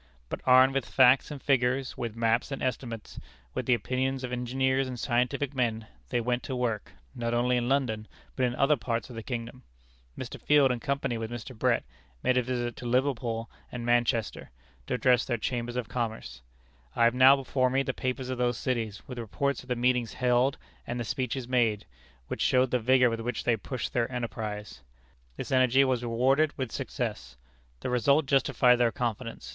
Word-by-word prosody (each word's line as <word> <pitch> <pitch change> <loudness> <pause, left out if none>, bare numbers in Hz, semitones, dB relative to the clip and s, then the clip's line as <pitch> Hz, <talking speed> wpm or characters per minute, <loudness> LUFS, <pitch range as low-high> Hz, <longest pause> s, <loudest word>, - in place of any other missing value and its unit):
But - - -5
armed 130 +1 +7
with 135 -3 -1
facts 130 0 +5
and 145 -2 -6
figures, 130 -1 +1
with 115 -2 -4
maps 115 +3 +1
and 135 - -4
estimates, 120 -3 -4 0.3
with - - -3
the 125 - +5
opinions 130 +4 -2
of 125 - -4
engineers 130 +2 0
and 125 -2 -6
scientific 125 +3 0
men, 115 -4 -1 0.2
they - - +1
went 120 +1 -1
to 130 - -5
work, 115 -4 -2 0.2
not 120 -2 -2
only 125 +1 +2
in 120 0 0
London, 120 -6 0 0.3
but 130 - -1
in 120 - -3
other 140 +3 +3
parts 115 +1 -3
of - - -9
the 115 - -5
kingdom. 120 +1 -6 0.6
Mr. - - -7
Field, 145 -3 +4
in 125 - -2
company 140 -3 -2
with 110 -1 -4
Mr. 120 +2 -7
Brett, - - +1 0.4
made 130 - +3
a 125 - +4
visit 120 -1 -3
to 120 - -6
Liverpool 120 -3 0 0.2
and 120 -1 -5
Manchester, 120 -2 0 0.4
to - - 0
address 125 -1 +3
their 120 - -1
Chambers 120 +1 -3
of 125 -3 -2
Commerce. 115 -2 -4 0.5
I - - +3
have 115 0 +5
now 130 +2 +7
before 130 -1 0
me 135 +2 +1
the - - -2
papers 130 0 -3
of 125 - -4
those 120 -1 +1
cities, 115 -5 -2
with 125 -2 -6
reports 140 +5 -2
of 125 - -17
the 125 - +1
meetings 125 -1 +1
held 125 +2 +2 0.3
and 120 - -3
the - - -1
speeches 125 +2 -3
made, 115 -5 +1 0.4
which - - -4
show 130 0 +4
the 125 -1 0
vigor 125 +1 +4
with 115 - -3
which 120 -1 -3
they 120 - +3
pushed 125 +5 -5
their 120 -1 0
enterprise. 105 - -5 0.6
This - - -6
energy 130 +1 +5
was 130 -3 +1
rewarded 130 +6 +2
with 130 -4 -3
success. - - -4 0.4
The - - -3
result 140 +5 +3
justified 135 -2 +4
their 120 -1 +3
confidence. 120 -2 -4
125 Hz, 190 wpm, -28 LUFS, 115-130 Hz, 0.6 s, armed